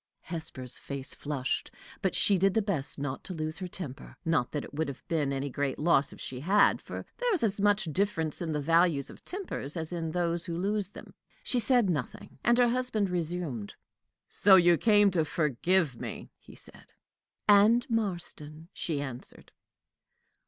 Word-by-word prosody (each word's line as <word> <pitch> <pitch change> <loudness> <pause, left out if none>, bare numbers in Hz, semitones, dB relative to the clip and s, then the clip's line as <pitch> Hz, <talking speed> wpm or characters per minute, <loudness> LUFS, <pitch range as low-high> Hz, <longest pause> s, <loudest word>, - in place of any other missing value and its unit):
Hesper's 150 -7 -4
face 140 -1 -5
flushed, 140 -3 -3 0.3
but 190 -4 0
she 200 - +5
did 195 +1 +3
her 220 - +4
best 170 -10 -1
not 140 -1 -4
to 185 - -6
lose 155 +1 -4
her 185 - -4
temper. 155 -7 -8
Not 160 -7 +1
that 145 - -3
it - - -11
would 155 +1 -1
have 140 -2 -8
been 155 -5 0
any 140 0 -2
great 140 0 -2
loss 150 -3 +3
if - - -13
she 125 - -5
had, 195 +9 +3
for - - -7
there - - +1
is 325 - -1
as 200 -2 0
much 205 +1 +3
difference 170 -5 0
in 165 -2 -2
the 150 - -1
values 165 -1 +2
of - - -15
tempers 360 - -4
as 160 +1 -3
in 165 -2 -2
those 170 0 -1
who 170 -2 -4
lose 200 +1 +1
them. - - -12 0.3
She 250 - 0
said 240 -1 +3
nothing, 145 -5 -4
and 240 +1 +4
her 245 -1 +5
husband 235 -6 0
resumed: 165 - -3 0.5
"So 195 -1 +6
you 175 -2 +6
came 205 +1 +4
to 170 -3 +2
forgive 155 +1 +1
me?" - - -7
he - - -15
said. - - -9 0.5
"And 210 +4 +6
Marston," 175 -8 -4
she 155 -4 -2
answered. 130 -3 -8
170 Hz, 180 wpm, -29 LUFS, 145-200 Hz, 0.5 s, So